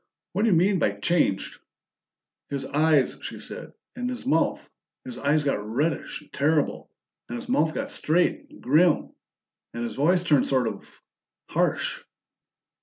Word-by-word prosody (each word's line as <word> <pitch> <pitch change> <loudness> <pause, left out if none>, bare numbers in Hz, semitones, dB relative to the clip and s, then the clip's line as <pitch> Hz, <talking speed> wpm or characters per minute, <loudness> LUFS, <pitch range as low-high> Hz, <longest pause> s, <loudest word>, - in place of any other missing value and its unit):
What 210 - +1
do - - +4
you 180 - +4
mean 190 +2 +3
by 100 - +2
changed?" 100 - 0 0.9
"His 140 -1 -3
eyes," 150 -1 +2
she - - -7
said. - - -8 0.2
"And 250 0 -3
his 250 -1 -5
mouth. 270 - +1 0.4
His 250 -2 -7
eyes 150 +2 +2
got 140 -7 0
reddish 140 +12 -2
and 150 - -21
terrible, 150 +1 +1 0.4
and - - -4
his 240 - -8
mouth 160 - +1
got - - -3
straight 170 +4 +1
and - - -16
grim. 155 +5 +3 0.6
And 120 - -3
his 115 -2 -3
voice 175 +7 +2
turned 150 -6 +3
sort 130 -3 +2
of 100 -3 -6 0.6
harsh." - - 0
155 Hz, 155 wpm, -25 LUFS, 135-180 Hz, 0.9 s, do